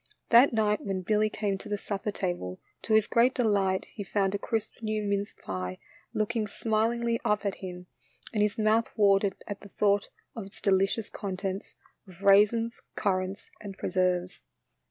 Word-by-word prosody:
That 240 +4 +7
night 215 -2 +1
when 190 -2 -3
Billy 215 +2 +2
came 205 -2 -2
to 215 - -8
the 205 - 0
supper 200 +1 -3
table, 175 - -3 0.2
to 220 - +1
his 220 -1 +5
great 240 +4 +3
delight 200 -5 +2
he 205 - -5
found 195 0 0
a 200 - -1
crisp 225 +1 -3
new 215 -1 -1
mince 200 0 -1
pie 90 -1 -5 0.3
looking 215 0 -1
smilingly 230 +2 0
up 210 0 +1
at 200 - -1
him, 180 -1 -7 0.5
and 210 - +1
his 210 0 +1
mouth 220 +1 +2
watered 200 -1 +4
at 205 -1 -6
the 200 - -12
thought 200 +1 +1 0.3
of 220 -4 -6
its 195 - -13
deli 195 -1 +3
cious 220 +2 -4
contents 195 -1 -4 0.3
of 185 +1 -14
raisins, 210 +4 +4
currants, 190 0 -1
and 195 -2 -8
pre - - -3
serves. 180 -1 0
205 Hz, 175 wpm, -28 LUFS, 195-215 Hz, 0.5 s, That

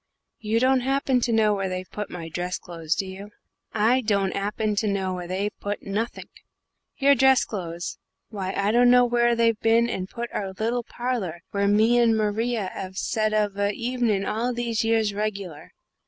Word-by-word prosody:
You 220 +1 0
don't 260 +1 +3
happen 265 0 +1
to 240 - 0
know 220 -2 +3
where 195 -2 -2
they've 185 0 -5
put 210 0 -5
my 170 -2 -7
dress 180 +2 -3
clothes, 165 -2 -3
do 195 - -2
you?" 190 +2 -8 0.4
"I 230 +4 +3
don't 200 -3 +1
'appen 210 +1 -1
to 215 - +1
know 190 -2 -1
where 180 -1 -5
they've 195 +3 -2
put 205 0 -4
nothink. 215 +4 -4 0.7
Your 280 0 +5
dress 265 0 +4
clothes? 175 -4 -5 0.3
Why, 195 -4 -4
I 200 +1 +2
dunno 245 +1 +6
where 240 0 +2
they've 230 -2 +2
bin 230 +1 +3
and 185 0 -4
put 235 0 -6
our 195 -2 -3
little 230 +5 -1
parler 225 -10 -4
where 200 0 +1
me 220 +4 +4
and 230 -2 +4
Maria 215 -1 -1
'ave 190 -1 -6
set 215 +3 -1
of 210 -2 0
a 200 0 0
hevenin' 235 -5 0
all 235 +4 -1
these 235 -2 -1
years 225 -2 +1
regular. 200 -7 -4
215 Hz, 185 wpm, -25 LUFS, 195-235 Hz, 0.7 s, dunno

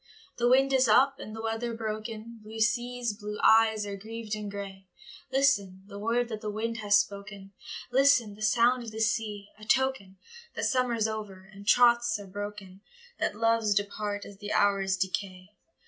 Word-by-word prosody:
The 240 0 +3
wind 270 +2 +4
is 260 -1 +4
up, 270 +5 +4
and 215 - -8
the 225 - -7
weather 225 +1 -2
broken, 220 +1 -6
Blue 220 +1 -9
seas, 240 0 0
blue 210 0 -7
eyes, 220 -1 +5
are 200 -1 -5
grieved 220 +2 -7
and 210 -1 -4
grey, 195 -1 -8 0.4
Listen, 205 -9 +1
the 200 0 -9
word 235 +3 0
that 215 -2 -5
the 215 - -4
wind 225 +2 -3
has 205 -2 +4
spoken, 200 -1 -6 0.4
Listen, 260 -5 +4
the 210 - -15
sound 235 +4 +3
of 235 - -7
the 220 0 -8
sea,—a 215 -2 -2
token 250 -6 0 0.4
That - - -2
summer's 240 -4 +1
over, 205 -3 -6
and 200 +1 -13
troths 240 -1 +4
are 205 - -9
broken,— 200 -1 -8 0.4
That - - -1
loves 225 -1 +2
depart 205 0 -2
as 200 -1 -12
the 205 0 -6
hours 195 -1 +2
decay. 185 0 -3
215 Hz, 170 wpm, -28 LUFS, 200-235 Hz, 0.4 s, eyes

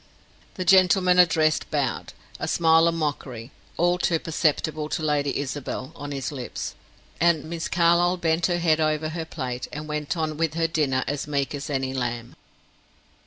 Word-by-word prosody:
The 185 - -4
gentleman 185 0 +5
addressed 160 -3 +3
bowed, 140 -5 -2 0.3
a - - -3
smile 165 0 +4
of 165 - +1
mockery, 140 -6 -4 0.3
all 175 +1 +2
too 170 -2 +2
perceptible 155 -1 -1
to 160 - -2
Lady 145 -2 0
Isabel, 140 -1 -4
on 145 0 -7
his 135 -2 -3
lips. 130 -4 -5 0.5
And 170 -3 +3
Miss 165 +1 -4
Carlyle 175 +1 +3
bent 165 0 +1
her 175 -1 0
head 165 -2 +2
over 155 0 0
her 165 0 -4
plate, 130 -6 -5
and 150 +1 -6
went 150 +2 -3
on 155 -2 -2
with 160 -1 -1
her 165 0 +1
dinner 145 -6 0
as 145 +1 -3
meek 140 -1 -1
as 145 +1 -5
any 135 -2 -1
lamb. 120 -2 -3
155 Hz, 165 wpm, -25 LUFS, 140-170 Hz, 0.5 s, gentleman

